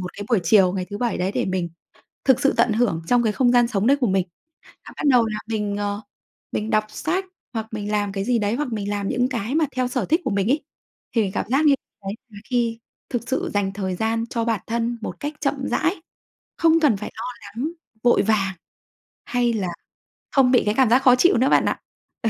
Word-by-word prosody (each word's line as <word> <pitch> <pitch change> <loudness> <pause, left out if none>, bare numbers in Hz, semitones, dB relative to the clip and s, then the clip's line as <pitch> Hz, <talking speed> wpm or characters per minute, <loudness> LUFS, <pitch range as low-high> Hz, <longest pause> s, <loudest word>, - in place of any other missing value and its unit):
một 180 -1 -5
cái 205 - -7
buổi 225 -6 +3
chiều 185 +1 +5
ngày 185 -2 -2
thứ 205 - -5
Bảy 240 -2 -1
đấy 185 +2 -1
để - - 0
mình 185 -2 -1 0.6
thực 265 -3 +4
sự 275 - +3
tận 240 - +4
hưởng 215 -8 +1
trong 245 +3 +3
cái 220 -2 +1
không 245 0 +3
gian 245 -1 +5
sống 210 -2 0
đấy 280 +2 +5
của 250 - +2
mình. 190 -2 +1 0.6
Và - - -10
bắt - - -5
đầu 245 -3 +5
là 215 -1 -3
mình, 210 -2 -2
ờ, 205 0 -2 0.5
mình 215 +1 -2
đọc 215 0 +3
sách 340 - -2 0.3
hoặc 225 -1 -3
mình 210 -1 -4
làm 205 -1 0
cái 195 -1 -2
gì 245 +1 +2
đấy, 210 0 0
hoặc 280 +1 -2
mình 205 -2 -2
làm 200 -1 -2
những 245 +1 +1
cái 235 +1 -3
mà 320 0 +3
theo 255 -1 0
sở 250 -3 -1
thích 325 - +2
của - - 0
mình 200 0 0
ấy, 295 +1 +1 0.5
thì 230 - +3
mình 195 -2 -2
cảm - - -1
giác 275 +4 +3
như 285 - +6 0.3
đấy 195 - -3 0.2
là 210 -3 -12
khi 235 -2 0 0.3
thực 245 -1 -3
sự 265 - -1
dành 200 -1 0
thời 190 -2 -3
gian 225 +3 0
cho 230 -1 -1
bản 225 -4 0
thân 235 +1 -1
một - - -6
cách 290 +1 -3
chậm 290 -1 +1
rãi, 325 +4 +1 0.6
không 330 0 +4
cần 285 -9 +4
phải 210 - -6
lo - - -5 0.2
lắng, 230 +10 -5 0.3
vội 240 -4 +4
vàng, 195 -2 +1 0.7
hay 245 -1 +1
là 200 -5 -1 0.6
không 265 -2 +4
bị 250 - +4
cái 210 - +2
cảm 260 -4 +5
giác 250 +3 +5
khó 250 -2 +7
chịu 345 +5 +4
nữa 260 +3 +3
bạn - - +4
ạ. - - 0 0.4
Ừ. 225 - +2
225 Hz, 240 wpm, -23 LUFS, 205-250 Hz, 0.7 s, khó